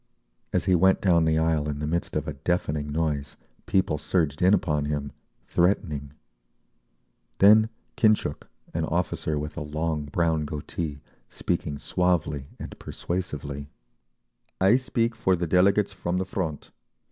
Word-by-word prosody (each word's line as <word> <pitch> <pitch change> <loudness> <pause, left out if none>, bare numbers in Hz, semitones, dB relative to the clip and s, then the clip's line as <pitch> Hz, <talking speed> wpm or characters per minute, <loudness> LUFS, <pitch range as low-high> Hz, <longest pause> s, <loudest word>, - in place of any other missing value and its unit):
As - - 0
he 95 - +3
went 95 +2 +4
down 85 -4 +3
the 80 0 +2
aisle 80 -2 +1
in 75 - -3
the 75 - -3
midst 85 +3 -2
of 75 -1 -1
a 75 - -3
deafening 75 -1 -1
noise, 75 -2 -2 0.3
people 85 -6 +1
surged 75 -5 0
in 90 +1 +5
upon 75 -7 +2
him, 75 -1 -2 0.3
threatening…. 80 -6 0 1.2
Then 110 +2 +7 0.3
Khintchuk, 110 -1 +2 0.3
an - - 0
officer 75 -1 -1
with 75 +2 -5
a - - -3
long 75 0 -2
brown 80 0 0
goatee, 75 0 -5 0.3
speaking 75 -4 -2
suavely 80 -6 0
and - - -9
persuasively: 75 -5 -4 0.9
"I 95 +5 +5
speak 120 -3 0
for 95 -4 +2
the 85 0 -2
delegates 95 +4 +3
from 90 -1 -2
the 95 - -1
Front. 85 -6 -4
80 Hz, 140 wpm, -26 LUFS, 75-95 Hz, 1.2 s, Then